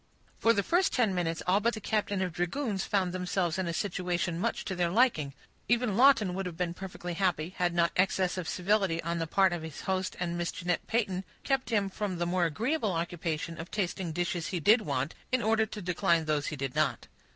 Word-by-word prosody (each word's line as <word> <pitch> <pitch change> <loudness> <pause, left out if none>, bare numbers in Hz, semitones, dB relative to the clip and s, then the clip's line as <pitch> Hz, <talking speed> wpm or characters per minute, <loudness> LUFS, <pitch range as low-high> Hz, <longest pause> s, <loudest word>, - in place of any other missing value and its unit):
For 230 - +5
the 200 -3 +2
first 355 - +2
ten 225 -6 +2
minutes 170 -2 -1
all 185 +3 +4
but 235 +3 +1
the - - -5
captain 205 -2 0
of 180 -3 -3
dragoons 195 - -1
found 185 -3 0
themselves 180 -1 -1
in 185 - -1
a - - 0
situation 175 -2 -1
much - - -1
to 190 - -2
their 175 -1 +1
liking. 170 - +2 0.3
Even 240 -3 +2
Lawton 235 -6 +5
would 190 0 -3
have 170 -2 -7
been 175 -1 -1
perfectly 180 -1 -6
happy, 175 -1 0
had 175 -1 +1
not 170 -1 +3
excess 185 -1 +2
of 180 -3 -4
civility 190 -2 +1
on 170 +1 -2
the 165 - -2
part 190 +2 +3
of 175 - -3
his 160 -3 -7
host 190 -1 -1
and 175 -1 -2
Miss 175 - -1
Jeanette 175 -1 -2
Peyton 195 -5 0 0.2
kept 270 -1 0
him 205 -4 +2
from 195 -1 -3
the 175 - 0
more 175 0 +1
agreeable 220 - 0
occupation 165 -1 -3
of 165 - -6
tasting 185 -3 -2
dishes 175 0 -2
he 180 - -2
did 215 +9 +5
want, 140 -4 -2 0.2
in 255 -2 +2
order 220 0 +2
to 210 - -7
decline 175 -2 +2
those 150 -1 0
he - - -3
did 135 -2 -3
not. 155 -3 0
180 Hz, 220 wpm, -30 LUFS, 170-205 Hz, 0.3 s, For